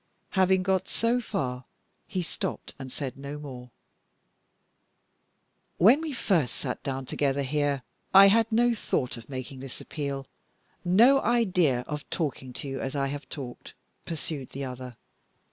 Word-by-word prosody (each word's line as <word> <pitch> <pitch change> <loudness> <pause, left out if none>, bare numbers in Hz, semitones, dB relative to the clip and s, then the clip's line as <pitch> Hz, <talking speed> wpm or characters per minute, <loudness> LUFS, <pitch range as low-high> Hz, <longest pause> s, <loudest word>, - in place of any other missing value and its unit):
Having 190 -1 +3
got 190 0 +1
so 235 +2 +1
far, 130 - -3 0.4
he 185 -2 -2
stopped - - -4
and 130 -1 -7
said 135 -3 -4
no 140 +2 -6
more. 130 -4 -8 2.1
"When 235 - +7
we 320 -2 -3
first 180 - +1
sat 125 -3 -3
down 135 -1 -3
together 140 +1 0
here, 140 -1 0 0.3
I 195 +1 +10
had 225 +2 +3
no 240 +2 +4
thought 130 - -1
of 115 +1 -11
making 130 0 -6
this 135 -1 -8
appeal, 140 -3 -4 0.6
no 230 +10 +6
idea 180 - +3
of 150 +3 -6
talking 140 -6 -2
to 140 - -5
you 135 0 -3
as 135 +2 -3
I 140 -1 +1
have 145 +1 -6
talked," 130 -5 -8 0.3
pursued 150 -4 -4
the 140 0 -3
other. 125 -2 -7
145 Hz, 145 wpm, -28 LUFS, 130-190 Hz, 2.1 s, I